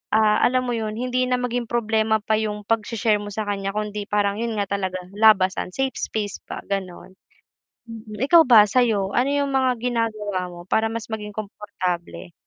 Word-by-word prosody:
ah, 215 Hz, -1 st, +4 dB
alam 255 Hz, +1 st, +2 dB
mo -, -, -1 dB
yun, 215 Hz, -1 st, -3 dB
hindi 250 Hz, +1 st, 0 dB
na 250 Hz, -, +3 dB
maging 245 Hz, -1 st, -2 dB
problema 220 Hz, -2 st, +1 dB
pa 215 Hz, 0 st, +1 dB
yung 210 Hz, -1 st, -3 dB
pag-she-share 220 Hz, -1 st, +1 dB
mo 205 Hz, -, -7 dB
sa 215 Hz, -, -2 dB
kan'ya 195 Hz, -1 st, -2 dB
kundi 210 Hz, -1 st, -3 dB
parang 205 Hz, -1 st, +1 dB
yun 230 Hz, -1 st, -2 dB
nga 200 Hz, -, +1 dB
talaga 185 Hz, -1 st, -2 dB, 0.2 s
labasan, 190 Hz, -5 st, +4 dB
safe 270 Hz, -1 st, -1 dB
space 210 Hz, -2 st, -3 dB
pa -, -, -6 dB
gano'n. 190 Hz, -2 st, -5 dB, 0.8 s
Mm 220 Hz, -2 st, -9 dB
ikaw 335 Hz, +3 st, +7 dB
ba 225 Hz, -4 st, +8 dB
sa 255 Hz, +5 st, +3 dB
'yo? 200 Hz, -4 st, -1 dB
Ano 250 Hz, +3 st, +2 dB
yung 285 Hz, -1 st, 0 dB
mga 260 Hz, -1 st, +2 dB
ginagawa 215 Hz, -6 st, -2 dB
mo 175 Hz, 0 st, -10 dB
para 220 Hz, +3 st, +2 dB
mas 230 Hz, -1 st, -4 dB
maging 210 Hz, -1 st, -5 dB
komportable? 185 Hz, -5 st, -5 dB
215 Hz, 185 wpm, -23 LUFS, 205-235 Hz, 0.8 s, ba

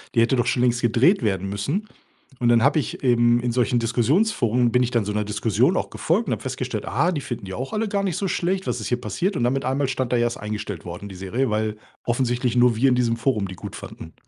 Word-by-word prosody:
Die 115 Hz, -, +5 dB
hätte 125 Hz, +3 st, +3 dB
doch 120 Hz, -, +2 dB
schon 125 Hz, -, +1 dB
längst 120 Hz, -1 st, +2 dB
gedreht 125 Hz, -, +3 dB
werden 95 Hz, -2 st, -1 dB
müssen.“ 145 Hz, -, -2 dB, 0.5 s
Und, 120 Hz, -, +1 dB
dann 120 Hz, -1 st, +4 dB
habe 145 Hz, +3 st, +4 dB
eben 120 Hz, -3 st, +2 dB
in 120 Hz, 0 st, -1 dB
solchen 125 Hz, 0 st, +2 dB
Diskussionsforen, 120 Hz, -, +2 dB
bin 125 Hz, -, +3 dB
ich 125 Hz, -, -2 dB
dann 120 Hz, -3 st, +1 dB
so 105 Hz, -, -2 dB
‘ner 105 Hz, 0 st, -1 dB
Diskussion 105 Hz, 0 st, +1 dB
auch -, -, -2 dB
gefolgt, -, -, 0 dB
und -, -, +1 dB
habe -, -, -4 dB
festgestellt: -, -, -4 dB
„Aha, 175 Hz, -, +1 dB
die 160 Hz, -, -2 dB
finden 120 Hz, -6 st, -6 dB
die 95 Hz, -, -7 dB
auch 130 Hz, +6 st, -5 dB
alle 215 Hz, 0 st, -1 dB
gar 200 Hz, 0 st, 0 dB
nicht 185 Hz, -5 st, -1 dB
so 195 Hz, -, -1 dB
schlecht. 185 Hz, +3 st, -1 dB
Was -, -, -1 dB
ist -, -, -4 dB
hier 125 Hz, 0 st, -1 dB
passiert?“ 190 Hz, +7 st, -2 dB
Und, 120 Hz, -, 0 dB
dann 120 Hz, -, +3 dB
mit 135 Hz, -, -2 dB
einmal 135 Hz, +1 st, 0 dB
stand 130 Hz, -1 st, -2 dB
da: -, -, +3 dB
„Ja, 120 Hz, -, +2 dB
ist 120 Hz, -, -4 dB
eingestellt 105 Hz, -4 st, -5 dB
worden 90 Hz, +4 st, -7 dB
die 95 Hz, -, -9 dB
Serie“, 110 Hz, +8 st, -1 dB
weil 110 Hz, 0 st, -1 dB, 0.3 s
offensichtlich 120 Hz, 0 st, 0 dB
nur 120 Hz, -1 st, +4 dB
wir 135 Hz, +3 st, +3 dB
in 125 Hz, -, +3 dB
diesem 120 Hz, -2 st, +1 dB
Forum 115 Hz, -5 st, 0 dB
die 95 Hz, -, -7 dB
gut -, -, -8 dB
fanden. 80 Hz, -, -10 dB
120 Hz, 260 wpm, -23 LUFS, 110-135 Hz, 0.5 s, Die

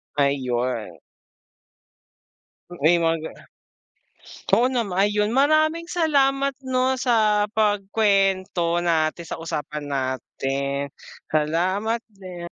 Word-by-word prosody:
Ayon. 125 Hz, -, -1 dB, 1.7 s
Oo, 175 Hz, -5 st, -10 dB
yung 170 Hz, +1 st, +4 dB
mga 165 Hz, 0 st, +1 dB
ga, -, -, -5 dB
ah -, -, -17 dB, 1.2 s
Oo 250 Hz, -, +4 dB
naman, 235 Hz, -7 st, -2 dB, 0.2 s
ayun, 210 Hz, +2 st, 0 dB
maraming 310 Hz, +4 st, +2 dB
salamat 275 Hz, -5 st, +2 dB
'no 260 Hz, 0 st, +1 dB
sa 215 Hz, -4 st, +2 dB
pagkuwento 195 Hz, -4 st, +1 dB
natin, 165 Hz, -1 st, 0 dB
sa 165 Hz, -, -6 dB
usapan 150 Hz, -2 st, -5 dB
natin. 135 Hz, +1 st, -3 dB, 0.4 s
Salamat 185 Hz, +9 st, 0 dB
din. 185 Hz, -3 st, -10 dB
185 Hz, 95 wpm, -23 LUFS, 150-230 Hz, 1.7 s, yung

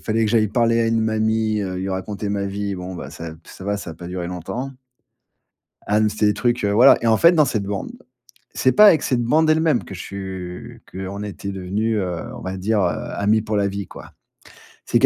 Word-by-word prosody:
fallait 115 Hz, 0 st, 0 dB
que 105 Hz, -, 0 dB
j'aille 110 Hz, -2 st, +3 dB
parler 115 Hz, +1 st, +2 dB
à 115 Hz, -, +2 dB
une 115 Hz, 0 st, +1 dB
mamie, 110 Hz, 0 st, +1 dB
heu, 95 Hz, -2 st, -3 dB
lui 95 Hz, +1 st, -3 dB
raconter 100 Hz, +2 st, -4 dB
ma 100 Hz, -1 st, -1 dB
vie, 100 Hz, 0 st, -3 dB
bon 90 Hz, 0 st, -6 dB
bah, -, -, -7 dB
ça 80 Hz, -1 st, -7 dB
p 80 Hz, -, -19 dB
ça -, -, -12 dB
va, 100 Hz, 0 st, -1 dB
ça 85 Hz, -, -7 dB
a -, -, -8 dB
pas 85 Hz, +2 st, -10 dB
duré 90 Hz, -1 st, -4 dB
longtemps. 90 Hz, +10 st, -5 dB, 1.2 s
Ah 105 Hz, +1 st, +2 dB
mais 110 Hz, -, +3 dB
c'était 105 Hz, 0 st, 0 dB
des 105 Hz, -, +3 dB
trucs, 120 Hz, +2 st, 0 dB
heu, 100 Hz, -, +1 dB
voilà, 120 Hz, +6 st, +7 dB
et 115 Hz, -, 0 dB
en 110 Hz, -, +5 dB
fait 170 Hz, +8 st, +6 dB
dans 155 Hz, -3 st, +5 dB
cette 110 Hz, -7 st, -1 dB
bande, 100 Hz, -, -4 dB, 0.6 s
c'est 130 Hz, -, +2 dB
pas 210 Hz, -, +7 dB
avec 165 Hz, -6 st, +5 dB
cette 120 Hz, -2 st, +1 dB
bande 155 Hz, +6 st, +3 dB
elle-même 155 Hz, -4 st, +2 dB
que -, -, -10 dB
je 90 Hz, -, -8 dB
su 95 Hz, +4 st, -7 dB
qu'on 95 Hz, +2 st, -6 dB
était 100 Hz, -1 st, -6 dB
devenus, 100 Hz, +4 st, -1 dB
heu, 90 Hz, -3 st, -3 dB
on 120 Hz, -, -9 dB
va 95 Hz, +1 st, -5 dB
dire, 105 Hz, +3 st, 0 dB
heu, -, -, +3 dB, 0.3 s
amis 105 Hz, +2 st, +2 dB
pour 105 Hz, -1 st, -2 dB
la 100 Hz, -1 st, +2 dB
vie 100 Hz, 0 st, -5 dB
quoi. -, -, -12 dB, 0.7 s
C'est -, -, +2 dB
qu'il -, -, +5 dB
105 Hz, 240 wpm, -21 LUFS, 95-115 Hz, 1.2 s, voilà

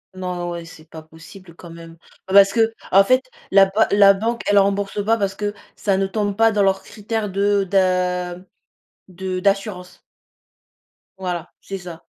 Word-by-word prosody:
Non, 180 Hz, -1 st, -4 dB
ouais, 170 Hz, -1 st, -6 dB
c'est 160 Hz, -1 st, -15 dB
pas 160 Hz, -1 st, -11 dB
possible 165 Hz, +2 st, -15 dB
quand 175 Hz, -, -13 dB
même. 165 Hz, 0 st, -12 dB, 0.3 s
Bah 190 Hz, -, -5 dB
parce 195 Hz, 0 st, +7 dB
que, 225 Hz, +1 st, +1 dB, 0.2 s
en 195 Hz, +1 st, +7 dB
fait, 255 Hz, +3 st, +1 dB, 0.2 s
la 195 Hz, 0 st, +6 dB
ba 210 Hz, +3 st, +1 dB
la 200 Hz, -1 st, +6 dB
banque, 230 Hz, +4 st, -2 dB
elle 205 Hz, 0 st, +3 dB
rembourse 200 Hz, +1 st, +1 dB
pas 225 Hz, +1 st, +2 dB
parce 195 Hz, -1 st, -2 dB
que 205 Hz, 0 st, -3 dB, 0.2 s
ça 195 Hz, -2 st, 0 dB
ne 195 Hz, 0 st, 0 dB
tombe 205 Hz, 0 st, -2 dB
pas 225 Hz, +1 st, +4 dB
dans 205 Hz, -1 st, +1 dB
leurs 195 Hz, 0 st, +1 dB
critères 215 Hz, +1 st, -5 dB
de 200 Hz, +1 st, +1 dB
d'a 180 Hz, -2 st, 0 dB, 0.7 s
de 185 Hz, 0 st, -5 dB
d'assurance 190 Hz, -2 st, -2 dB, 1.2 s
voilà, 175 Hz, -3 st, -5 dB
c'est 195 Hz, -, -6 dB
ça. 175 Hz, -3 st, -10 dB
195 Hz, 175 wpm, -20 LUFS, 180-205 Hz, 1.2 s, parce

